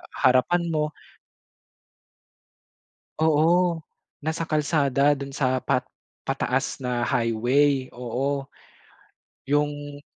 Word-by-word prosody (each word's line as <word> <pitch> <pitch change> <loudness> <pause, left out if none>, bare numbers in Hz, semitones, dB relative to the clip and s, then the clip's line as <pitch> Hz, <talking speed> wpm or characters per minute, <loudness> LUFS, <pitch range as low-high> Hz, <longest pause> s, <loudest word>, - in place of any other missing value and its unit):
harapan 130 +7 +3
mo. 155 -1 -1 2.3
Oo, 165 +3 +3 0.5
nasa 160 +1 -2
kalsada 145 -2 +2
do'n 140 -1 -4
sa 130 -2 +1
pat - - 0 0.4
pataas - - -1
na 125 -2 -1
highway. 130 +5 +1
Oo 135 +3 -3 1.0
yung 145 0 -1
145 Hz, 75 wpm, -25 LUFS, 130-150 Hz, 2.3 s, harapan